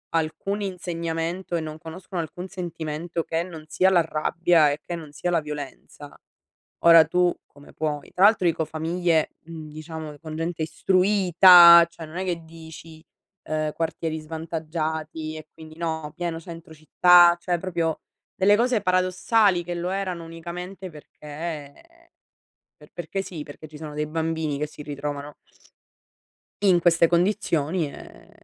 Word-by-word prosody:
alcun 165 +6 -2
insegnamento 175 -1 -4
e - - -2
non 155 -1 -7
conoscono 170 +2 -6
alcun 180 +3 -7
sentimento 170 -3 -5
che 165 +1 -2
non 165 -4 -10
sia 185 +4 +2
la 180 - +5
rabbia 160 0 +2
e 145 - -4
che 175 - -4
non 160 -3 -9
sia 175 - -3
la 165 - +2
violenza, 145 -1 -9 0.7
ora 165 -1 +8
tu 180 +3 +2
come 145 0 -18
puoi 150 -2 -4
Tra 185 - +3
l'altro 210 -3 +5
dico 165 -1 +1
famiglie, 165 +1 0
mhmm, 160 -2 -9
diciamo 155 -1 -8
con 155 -1 -8
gente 165 0 -3
istruita, 180 -1 +7
cioè 165 -1 -10
non 155 - -11
è 190 - -2
che 175 -2 -3
dici: 160 0 -13 0.5
"Uhm, 155 -1 -1
quartieri 160 -1 -3
svantaggiati, 160 0 -5
e 155 -1 -10
quindi" 155 -1 -13
no, 160 -2 -3
pieno 170 -2 -3
centro 165 0 -11
città. 175 +3 +5
Cioè 175 -1 -1
proprio 170 -3 -2 0.3
delle 205 +2 +4
cose 240 -1 +1
paradossali 185 +1 +2
che 175 +1 -4
lo 175 +1 -3
erano 185 -3 -3
unicamente 180 +3 -8
perché 150 -1 -8 1.0
per - - -18
perché 175 +3 -4
sì, 170 -5 -8
perché 150 +1 -11
ci 155 0 -12
sono 150 -1 -8
dei 150 0 -1
bambini 160 -2 -2
che 150 - -2
si 150 - -12
ritrovano 145 0 -6 1.3
in 185 -3 +5
queste 170 -1 +4
condizioni, 170 -3 0
ehm, - - -14
165 Hz, 150 wpm, -24 LUFS, 155-175 Hz, 1.3 s, ora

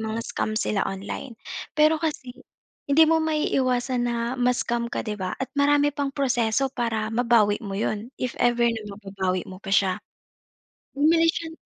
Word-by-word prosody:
mang-scam 220 0 -3
sila 205 -2 0
online. 200 +5 -6 0.4
Pero 310 +1 +5
kasi 300 -6 -3 0.6
hindi 300 +3 +6
mo 325 - +4
maiiwasan 260 -5 0
na 240 -1 -1 0.2
ma-scam 240 -1 0
ka - - -1
di 215 -1 -3
ba 185 -2 -3
at 265 - -4
marami 290 +1 +4
pang 280 -1 -2
proseso 260 -2 +1
para 225 -3 -1
mabawi 230 -3 +3
mo 200 - -5
'yon 215 +2 -2
if 250 -2 -1
ever 240 0 +3
na 225 -1 -2
mababawi 190 -3 -2
mo 185 - -8
pa 195 - -7
siya. 195 -2 +3 1.0
Bumili 325 +3 +4
siya 330 0 -2
ng - - -16
240 Hz, 160 wpm, -25 LUFS, 215-280 Hz, 1.0 s, hindi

